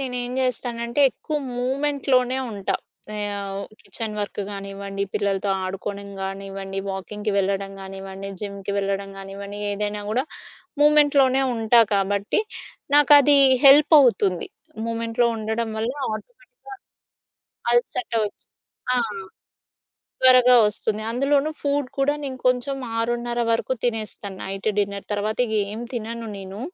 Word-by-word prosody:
నేనేం 250 -2 -3
జేస్తానంటే 240 -1 -1
ఎక్కువ 305 +4 -4 0.2
మూమెంట్‌‌లోనే 265 -1 +1
ఉంటా. 200 -3 -2 0.4
ఆహ్, 200 -1 -3 0.2
కిచెన్ 215 +2 -3
వర్క్ 205 0 -3
గానివ్వండి, 200 0 -5
పిల్లలతో 200 0 0
ఆడుకోడం 200 +2 -5
గానివ్వండి, 195 0 -5
వాకింగ్‌కి 205 +2 -4
వెళ్ళడం 195 0 -1
గానివ్వండి, 195 0 -8
జిమ్‌కి 200 -1 -5
వెళ్ళడం 195 0 -2
గానివ్వండి, 200 +1 -8
ఏదైనా 205 0 -3
గూడా 255 +5 +1 0.6
మూమెంట్‌‌లోనే 285 -3 +5
ఉంటా 225 +1 +4
కాబట్టి, 200 - +1 0.5
నాకది 290 -1 +7 0.3
హెల్ప్ 285 +3 +8
అవుతుంది. 195 -8 +2 0.4
మూమెంట్‌లో 230 +1 0
ఉండడం 220 +1 -2
వల్ల 225 +3 -1 0.2
ఆటోమేటిక్‌‌గా 480 - -10 1.0
అలసట 240 0 0
ఒచ్చి 205 - -12 0.5
ఆ! - - +2 1.3
త్వరగా 250 -1 +8
ఒస్తుంది. 210 0 -2
అందులోను 275 +4 +2
ఫూడ్ 285 -2 0
కూడా 275 +1 +2
నేను 260 -2 -4
కొంచెం 255 +2 +1 0.2
6:30 240 +1 -1
వరకు 230 +3 0
తినేస్తాను. 215 -4 -3
నైట్ 195 +2 -3
డిన్నర్ 200 -1 -1
తర్వాత 210 +1 -2
ఇగేం 215 -1 -2
తినను 230 0 -5
నేను. 195 +1 -8
220 Hz, 110 wpm, -23 LUFS, 200-255 Hz, 1.3 s, హెల్ప్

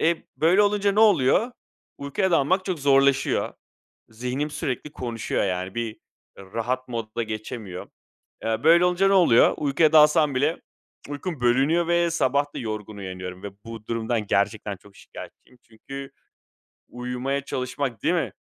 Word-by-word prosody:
E, 165 +1 +3 0.2
böyle 175 +6 +4
olunca 205 -1 +2
ne 210 - +2
oluyor? 210 - +4 0.5
Uykuya 160 +7 -1
dalmak 180 +5 +2
çok 185 -4 -3
zorlaşıyor. 140 -1 +2 0.6
Zihnim 125 +6 -4
sürekli 145 0 -4
konuşuyor, 115 -4 -3
yani. 95 +1 -3
Bir 115 -2 -4 0.4
rahat 120 +6 -4
modda 115 -1 -4
geçemiyor. 110 -3 -6 0.6
Iıı, 110 +1 -2
böyle 170 +2 +6
olunca 180 +2 +2
ne 195 - +2
oluyor? 165 -11 +5
Uykuya 150 +2 +2
dalsam 150 -2 +5
bile 150 +6 0 0.5
uykum 145 +1 -5
bölünüyor 140 +8 +2
ve 170 0 +2
sabah 145 -2 0
da - - -4
yorgun 110 -2 -5
uyanıyorum 95 -1 -7
ve 100 - -6
bu 115 -2 -9
durumdan 115 -1 -2
gerçekten 100 0 0
çok 100 +1 -20
şikâyetçiyim 125 - -13
çünkü 135 +4 -10 0.8
uyumaya 125 +3 -3
çalışmak 130 -1 -4
değil - - +2
mi? - - -1
130 Hz, 140 wpm, -24 LUFS, 115-160 Hz, 0.8 s, böyle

